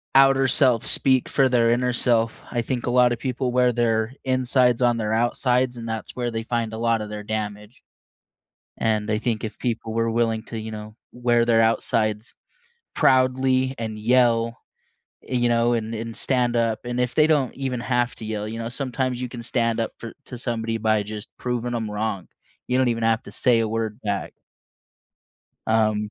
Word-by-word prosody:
outer 135 0 +6
self 125 -4 +3
speak 130 -2 +2
for 135 - +3
their 120 -2 +3
inner 125 +1 +1
self, 115 -2 +1
I 120 - 0
think 120 +1 -3
a - - +1
lot 125 0 +5
of 120 - -6
people 130 -1 -2
wear 125 0 +3
their 115 0 0
insides 130 -1 +2
on 120 -1 +3
their 110 -1 -1
outsides, 125 +2 +1
and 115 -1 -7
that's 110 -1 -5
where 120 -1 -2
they 115 0 -3
find 115 -1 -2
a - - -4
lot 115 -1 +1
of 105 - -6
their 105 0 -6
damage. 105 0 -5 0.9
And 110 -1 0
I 105 - +2
think 115 -2 -2
if 110 - -6
people 115 -2 -3
were 115 0 +1
willing 115 -1 0
to, 115 - -7
you 110 0 -6
know, 105 0 -8 0.2
wear 120 -1 +2
their 115 -1 +4
outsides 110 -1 0 0.6
proudly 130 0 +3
and 110 -2 -5
yell, 115 0 +2 0.7
eh, 130 - -3
you 120 -1 +2
know, 120 +1 +2
and 115 -1 -2
and 115 0 -5
stand 125 -2 +1
up, 115 -2 +1
and 120 0 -3
if 125 0 0
they 155 0 +5
don't 145 -5 +2
even 130 -3 -3
have 120 0 0
to 110 - -8
yell, 105 -1 -3
you 110 +1 -5
know, 115 0 -4
sometimes 130 0 -2
you 125 - -3
can 120 -1 -8
stand 115 -1 0
up 115 - -2
for 115 - -8
to 125 - -8
somebody 115 -2 -2
by 110 -1 +2
just 105 0 -8
proving 120 -1 -2
'em 110 -2 -3
wrong. 105 -3 -3 0.4
You 125 - +1
don't 130 - +3
even 115 -1 -1
have 115 0 +2
to - - -11
say 120 -3 +3
a 115 - +1
word 110 0 -3
back. 100 -2 -2 1.4
Um 110 -1 +1
115 Hz, 195 wpm, -23 LUFS, 110-125 Hz, 1.4 s, outer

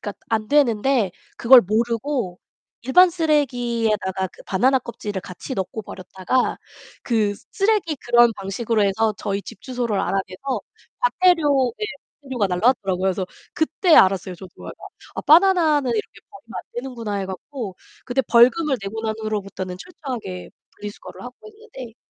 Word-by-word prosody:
그러니까 205 - -5 0.2
안 220 -1 -1
되는데 250 -6 +2 0.3
그걸 250 +1 +8
모르고 230 -1 -1 0.4
일반 350 +9 +6
쓰레기에다가 235 - 0
그 - - -17
바나나 260 +8 +2
껍질을 210 -5 -6
같이 185 +10 -8
넣고 195 +3 -4
버렸다가 190 +6 -2 0.4
그 215 -4 +1 0.2
쓰레기 395 -7 +1
그런 240 -2 +4
방식으로 210 +3 -1
해서 215 +2 +1
저희 200 -1 -3
집 195 - -11
주소를 245 -5 -2
알아내서 195 +7 -2 0.4
과태료 330 - +3
네 425 - -2 0.4
과태료가 255 -7 -1
날라왔더라고요. 190 -1 +1
그래서 190 -1 0 0.3
그때 320 +2 +2
알았어요, 185 -1 +4
저도. 185 +1 -12 0.6
'아 - - -3
바나나는 315 -5 +4
이렇게 215 - -4
버리면 400 - -15
안 - - -6
되는구나.' 240 -4 -5
해 195 - -3
갖고 195 +2 -7 0.3
그때 250 +2 0
벌금을 255 +5 +4
내고 205 +3 -5
난 220 -1 -1
후로부터는 200 -4 -4
철저하게 245 - -7 0.3
분리수거를 210 0 -9
하고 245 0 -9
있는데 265 - -12
235 Hz, 355 characters per minute, -22 LUFS, 195-275 Hz, 0.6 s, 그걸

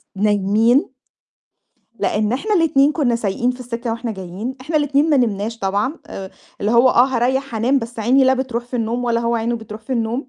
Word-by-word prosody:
نايمين، 210 +6 +2 1.1
لإن 210 +2 0
إحنا 420 - -1
الاتنين 300 -5 +3
كُنّا 265 -7 +1
سايقين 230 +2 -1
في 250 0 -7
السِكّة 240 -1 -4
وإحنا 230 0 -4
جايين، 190 +6 -6
إحنا 305 +5 -2
الاتنين 290 +1 +2
ما 295 - +4
نمناش 225 -2 -1
طبعًا 205 +11 -1
آآ، 190 -1 -8 0.3
اللي 205 - 0
هو 240 +2 +6
آه، 245 -1 +5
هاريّح 265 +1 -1
هانام، 245 +5 +2
بس 230 -1 -7
عيني 255 +5 +3
لا 260 0 +4
بترُوح 250 -2 -3
في 245 +1 -5
النوم 235 +2 -2
ولا 235 -1 +1
هو 235 0 0
عينه 235 +1 -1
بترُوح 220 -1 -9
في 220 +4 -6
النوم. 235 +3 -2
240 Hz, 195 wpm, -19 LUFS, 220-265 Hz, 1.1 s, هو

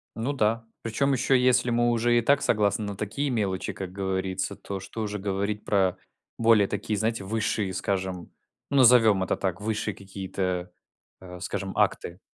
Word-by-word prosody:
Ну 120 +6 -2
да. 115 -2 0 0.2
Причем, 135 +5 +1
ещё 135 +1 +1
если 125 -1 +4
мы 120 0 +2
уже 120 0 +2
и - - +4
так 140 +4 +3
согласны 105 0 +1
на 100 -1 -4
такие 115 +8 -2
мелочи, 100 -6 -1
как 95 -2 -6
говорится, 95 -1 -2
то 100 -1 -6
что 95 +4 -7
уже 105 -1 -3
говорить 100 +1 -2
про 95 -3 +2 0.4
более 115 -3 +5
такие, 105 -1 -2
знаете, 110 -2 -1
высшие, 105 -2 -1
скажем, 95 -2 -3 0.4
ну 140 - +1
назовем 115 -6 +6
это - - 0
так, 95 0 -2
высшие 110 -1 -2
какие-то, 95 -2 -4 0.5
а, 90 -1 -10
скажем, 95 +1 -4
акты. 90 +2 0
105 Hz, 165 wpm, -26 LUFS, 95-115 Hz, 0.5 s, назовем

